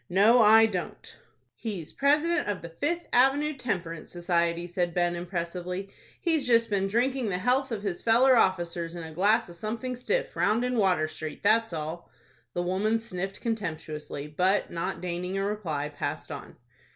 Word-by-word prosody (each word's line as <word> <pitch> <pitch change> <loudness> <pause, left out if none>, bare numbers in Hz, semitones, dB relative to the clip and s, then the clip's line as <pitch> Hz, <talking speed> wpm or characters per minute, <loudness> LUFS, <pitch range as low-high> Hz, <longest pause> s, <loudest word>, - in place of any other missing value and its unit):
"No, 210 +7 +5
I 220 +1 +7
don't." 185 -5 -5 0.3
"He's 200 -9 -6
President 300 +5 +2
of 205 -4 -3
the 170 - -6
Fifth 305 - -2
Avenue 280 +4 +3
Temperance 175 - -4
Society," 170 -1 0
said 175 -1 -2
Ben, 175 -1 +1
impressively. 180 +2 -4 0.3
"He's 325 -6 +1
just 230 -2 +3
been 195 -1 +1
drinking 245 +3 0
the 180 - -1
health 255 +6 +1
of 210 -3 -3
his 190 -4 -3
feller 250 +3 +5
officers 175 -5 +1
in 170 - -6
a 160 0 -8
glass 210 +7 +3
of 175 - -11
something 230 +6 -4
stiff, 370 - -2
round 230 +3 +2
in 250 0 -1
Water 185 -7 +2
Street, 155 0 -7
that's 225 +1 +3
all." 160 +1 -5 0.5
The 175 - 0
woman 195 +5 +1
sniffed 195 -4 -5
contemptuously, 155 - -4
but, 185 +7 +1
not 170 0 -3
deigning 180 +1 -3
a 195 - 0
reply, 165 -9 -2
passed 145 - -5
on. - - -8
195 Hz, 165 wpm, -28 LUFS, 170-230 Hz, 0.5 s, I